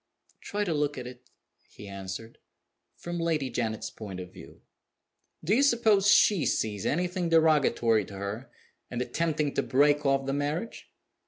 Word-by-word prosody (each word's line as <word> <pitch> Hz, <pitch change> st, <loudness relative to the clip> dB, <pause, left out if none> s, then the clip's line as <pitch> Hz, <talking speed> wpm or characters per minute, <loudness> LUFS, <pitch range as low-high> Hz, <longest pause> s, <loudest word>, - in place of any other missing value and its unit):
"Try 205 Hz, 0 st, -2 dB
to 175 Hz, -5 st, -1 dB
look 145 Hz, -1 st, -1 dB
at 125 Hz, -, -6 dB
it," 125 Hz, 0 st, -11 dB, 0.4 s
he 105 Hz, -, -12 dB
answered, 100 Hz, +3 st, -7 dB, 0.6 s
"from 175 Hz, 0 st, -5 dB
Lady 155 Hz, -6 st, -1 dB
Janet's 110 Hz, -2 st, -3 dB
point 100 Hz, -4 st, -8 dB
of 90 Hz, 0 st, -9 dB
view. -, -, -14 dB, 0.8 s
Do 175 Hz, +6 st, +1 dB
you 250 Hz, -, +4 dB
suppose 225 Hz, -7 st, +3 dB
she 205 Hz, -4 st, +5 dB
sees 105 Hz, -3 st, -1 dB
anything 180 Hz, +2 st, -1 dB
derogatory 140 Hz, -9 st, +3 dB
to 100 Hz, -, -11 dB
her 100 Hz, +6 st, -6 dB, 0.4 s
in 120 Hz, -, -4 dB
attempting 150 Hz, +2 st, -1 dB
to -, -, +1 dB
break 145 Hz, +2 st, +3 dB
off 135 Hz, -1 st, +1 dB
the 135 Hz, -, -1 dB
marriage? 150 Hz, +9 st, -3 dB
145 Hz, 155 wpm, -28 LUFS, 115-170 Hz, 0.8 s, she